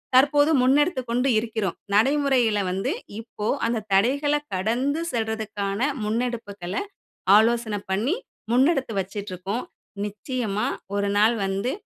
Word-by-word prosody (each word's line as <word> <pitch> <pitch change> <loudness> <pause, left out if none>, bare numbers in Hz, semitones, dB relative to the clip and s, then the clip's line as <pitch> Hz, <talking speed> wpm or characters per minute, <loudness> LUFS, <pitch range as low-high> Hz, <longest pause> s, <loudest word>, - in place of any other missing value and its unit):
தற்போது 290 +3 +5
முன்னெடுத்துக் 265 -1 +2
கொண்டு 250 +3 +1
இருக்கிறோம். 220 -5 -3 0.2
நடைமுறையில 255 -2 +3
வந்து 195 +9 -1 0.3
இப்போ 220 -2 -6 0.2
அந்த 230 -2 -1
தடைகள 280 +9 +3 0.2
கடந்து 245 - 0
செல்றதுக்கான 220 -3 -2 0.3
முன்னெடுப்புகள 215 -5 -3 0.7
ஆலோசன 230 -1 +2 0.2
பண்ணி 225 - +1 0.4
முன்னெடுத்து 265 0 +3
வச்சிட்டுருக்கோம். 195 +2 -4 0.4
நிச்சயமா 210 +1 -3 0.3
ஒரு 200 0 0
நாள் 220 +3 +5
வந்து 195 +6 -1
225 Hz, 100 wpm, -24 LUFS, 205-260 Hz, 0.7 s, தற்போது